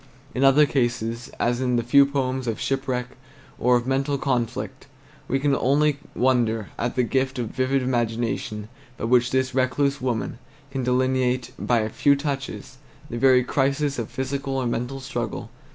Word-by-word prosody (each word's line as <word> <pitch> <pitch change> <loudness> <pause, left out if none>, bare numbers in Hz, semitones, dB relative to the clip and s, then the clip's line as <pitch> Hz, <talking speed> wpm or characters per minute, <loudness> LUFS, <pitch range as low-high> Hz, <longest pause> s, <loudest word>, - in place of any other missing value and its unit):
In 130 - 0
other 135 +2 +6
cases, 120 -3 -1
as 120 +1 +1
in 125 -1 +1
the 120 - +1
few 140 +4 +6
poems 130 -2 -1
of 115 - -2
shipwreck 130 -2 -1 0.5
or 125 +1 +4
of 120 0 +1
mental 135 +2 0
conflict, 125 -4 -2 0.4
we 135 - +1
can 140 0 +2
only 140 +2 +2 0.2
wonder 120 -4 +1
at 120 +1 -1
the 125 - +2
gift 130 +2 0
of 120 -3 -2
vivid 130 +1 0
imagination 115 -3 -1 0.3
by - - -7
which 120 +1 +3
this 130 0 0
recluse 135 +2 +1
woman 120 -2 -2 0.3
can 135 -1 -2
delineate, 125 0 +1
by 120 -2 +2
a 110 - -2
few 140 +5 +3
touches, 140 -2 -5 0.3
the 120 - -3
very 130 0 +5
crises 140 +1 0
of 115 - -4
physical 135 +1 -3
or 130 - -1
mental 125 +3 -2
struggle. 120 -4 -4
130 Hz, 165 wpm, -24 LUFS, 120-135 Hz, 0.5 s, other